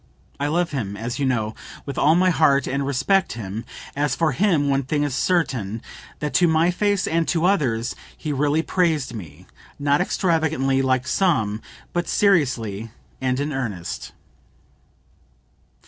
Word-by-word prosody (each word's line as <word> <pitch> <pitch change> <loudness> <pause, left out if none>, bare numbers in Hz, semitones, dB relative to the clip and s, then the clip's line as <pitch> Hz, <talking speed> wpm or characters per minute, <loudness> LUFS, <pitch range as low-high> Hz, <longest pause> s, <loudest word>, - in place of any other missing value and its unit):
I 145 - 0
love 170 +3 0
him, 105 -8 -3
as 120 +4 -4
you 140 - +1
know, 110 -4 0 0.3
with 140 - -5
all 155 +3 +4
my 185 +1 +4
heart, 140 -4 +3
and 140 +1 -1
respect 190 +8 +2
him; 110 0 -5 0.3
as 145 +1 0
for 165 -2 +2
him, 165 -2 +2
one 135 0 +2
thing 145 +3 -1
is 145 -3 -1
certain, 130 - 0 0.4
that 150 -1 -3
to 175 - +4
my 160 +2 +3
face 205 +1 +1
and 165 0 0
to 170 0 +1
others, 125 - +1 0.2
he 150 -2 -3
really 145 +3 +1
praised 160 -10 0
me, 90 -5 -9 0.3
not 145 +2 +2
extravagantly, 160 -8 +1
like 130 -1 +1
some, 115 - +1 0.3
but 175 -1 -1
seriously 125 - +1 0.3
and 130 0 0
in 145 +1 -2
earnest." 105 -10 -4
140 Hz, 150 wpm, -23 LUFS, 125-165 Hz, 0.4 s, all